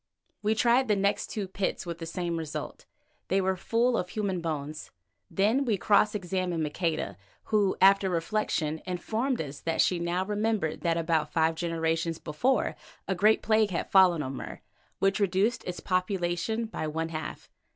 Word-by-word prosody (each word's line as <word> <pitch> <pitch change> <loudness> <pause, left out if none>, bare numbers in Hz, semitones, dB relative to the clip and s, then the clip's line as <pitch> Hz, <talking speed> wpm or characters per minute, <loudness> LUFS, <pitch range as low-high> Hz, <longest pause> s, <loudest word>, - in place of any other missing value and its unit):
We 215 +1 +1
tried 240 +4 +3
the 210 - +3
next 200 +1 +1
two 205 -3 -4
pits 190 0 -2
with 170 -1 -5
the 165 - -6
same 170 0 -2
result—they 165 +4 -5
were 190 0 +1
full 235 +6 +1
of 180 -4 -1
human 195 -4 -2
bones. 155 -2 -4 0.4
Then 220 +8 +2
we 225 -6 +1
cross 210 +2 +3
examined 180 -3 -1
Maqueda, 150 - -2 0.3
who, 205 -3 +2
after 195 0 +5
reflection, 165 -3 -1
informed 220 +8 -1
us 145 -2 -5
that 165 0 -2
she 180 - +3
now 175 +2 -1
remembered 210 -5 -1
that 170 -1 +1
about 160 -2 0
five 160 0 +2
generations 165 0 -1
before 235 - 0 0.3
a 195 - +1
great 210 +4 +3
plague 215 -1 +3
had 180 - -3
fallen 180 -5 +5
on 130 0 -4
Mur, - - -7 0.4
which 195 +1 +1
reduced 200 +4 +1
its 180 -2 -4
population 185 +4 -1
by 215 -8 -4
one 160 +1 -2
half. 160 -1 -6
185 Hz, 160 wpm, -28 LUFS, 165-210 Hz, 0.4 s, after